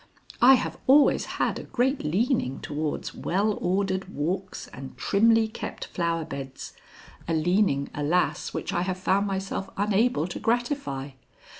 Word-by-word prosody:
"I 260 +2 +9
have - - -3
always 285 +2 +5
had - - 0
a - - -7
great 265 +2 0
leaning 180 - 0
towards 150 0 -3
well 205 +3 0
ordered 190 +1 0
walks 185 +6 -3
and 135 0 -10
trimly 225 +2 +3
kept 220 - -6
flower 170 -2 -2
beds 135 -3 -7 0.5
a 165 - +1
leaning, 160 -3 +2
alas! 155 +5 0
which 200 - -4
I 175 - +1
have 185 0 -2
found 195 +2 +1
myself 195 0 -3
unable 205 -2 +2
to - - -5
gratify." 235 - -1
190 Hz, 140 wpm, -26 LUFS, 155-220 Hz, 0.5 s, I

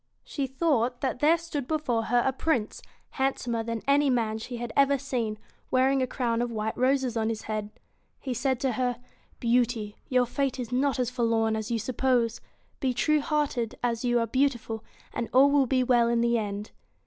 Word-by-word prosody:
She 275 -3 -3
thought 255 -3 0
that 260 -3 -1
there 315 +4 +5
stood 310 -6 -5
before 265 -8 0
her 240 0 +2
a 265 - +2
Prince, 260 -6 -1 0.3
handsomer 250 -3 -1
than 230 -1 -4
any 280 0 +4
man 225 -3 0
she 245 +2 -6
had 235 -1 -5
ever 280 0 +4
BEAUTY - - -4
seen, 230 -6 -2 0.3
wearing: 265 +1 +3
a 255 - +1
crown 240 -2 -1
of 240 0 -2
white 220 -1 -2
roses 260 -1 +1
on 220 -1 0
his 220 -1 -4
head. 215 -1 -3
BEAST 210 - -25 0.4
He 260 - -3
said 260 +1 0
to 265 - +1
her: 245 +1 -1 0.4
<Beaut 240 0 +2
y' 210 -2 -6 0.2
y 255 - +2
ur 250 - +4
fate 270 +2 -1
is 245 -1 -5
not 270 +2 +1
as 250 -1 -1
forlorn 230 -3 +1
as 220 +1 -4
you 235 - 0
suppose. 240 0 0 0.4
Be 260 -3 0
true 305 +3 +2
hearted 285 -7 -1
as 235 -1 0
you 240 -1 +2
are 230 - +1
beautiful, 240 -3 -1 0.3
and 235 - -3
all 275 +2 +6
will 280 -2 +4
be 255 0 +2
well 240 -2 +3
in 235 0 +2
the 235 0 +2
end.' 205 -2 -3
245 Hz, 205 wpm, -27 LUFS, 230-270 Hz, 0.4 s, all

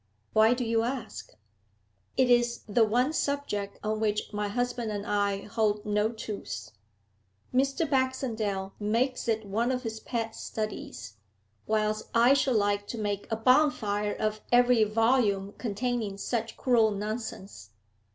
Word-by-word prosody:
Why 220 +3 +5
do 245 -1 -2
you 225 0 +2
ask?' 245 +1 -4 0.9
'It 260 - +4
is 240 -1 +3
the 225 +2 +4
one 245 +7 +2
subject 280 -10 -2
on 215 0 -1
which 210 -1 -1
my 210 0 -1
husband 245 +1 -2
and 205 -1 -4
I 200 -1 0
hold 210 -1 0
no 210 +1 +1
truce. 155 - -6 0.8
Mr. 275 +5 +1
Baxendale 230 -8 -1
makes 235 +5 0
it 220 -1 0
one 225 +5 0
of 255 0 -2
his 220 -1 -4
pet 225 -2 -3
studies, 160 - -6 0.5
whilst 215 0 0
I 240 +3 +6
should 270 -2 +2
like 205 -1 +1
to 235 - -5
make 205 -2 -2
a - - +2
bonfire 220 -5 +2
of 215 0 -2
every 245 -2 +5
volume 215 -3 +2
containing 225 -2 -2
such 225 +2 -3
cruel 235 -4 +4
nonsense. 205 - -5
220 Hz, 140 wpm, -28 LUFS, 205-245 Hz, 0.9 s, I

